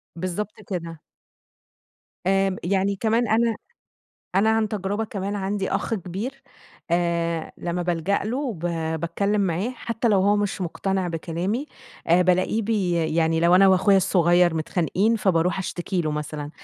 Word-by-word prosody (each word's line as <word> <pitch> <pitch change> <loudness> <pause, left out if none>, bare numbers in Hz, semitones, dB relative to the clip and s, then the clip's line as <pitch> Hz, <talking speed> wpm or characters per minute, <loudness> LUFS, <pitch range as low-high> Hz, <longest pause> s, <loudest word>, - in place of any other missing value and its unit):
بالضبط 185 +5 -4
كده. 165 -4 -5 1.3
آمم 195 -1 +2
يعني 195 +2 +1
كمان 225 +3 +1
أنا 225 0 +2 0.8
أنا 210 +3 +4
عن 220 -1 +2
تجربة 205 +1 -2
كمان 200 0 -4
عندي 195 0 -2
أخ 225 - -1
كبير 215 +9 -5 0.5
آآ 170 -1 0
لمّا 175 0 -2
بالجأ 175 +3 0
له 250 +3 -2
ب - - -11 0.4
باتكلّم 200 +5 0
معاه 190 +5 0
حتّى 230 -1 -2
لو 200 -3 +4
هو 205 +2 +3
مش 205 -1 -1
مُقتنع 185 +1 -1
بكلامي، 175 - -3 0.4
آآ، 175 +2 +5
بالاقيه 185 +5 +2
بي 205 -4 0 0.3
يعني 160 0 +2
لو 170 +1 +5
أنا 195 +1 +7
وأخويا 190 +1 +5
الصغيّر 175 -2 +3
متخانقين، 185 +7 +1
فباروح 180 -3 +1
اشتكي 180 0 -2
له 155 - -1
مثلًا، 150 0 -4
190 Hz, 140 wpm, -24 LUFS, 170-210 Hz, 1.3 s, أنا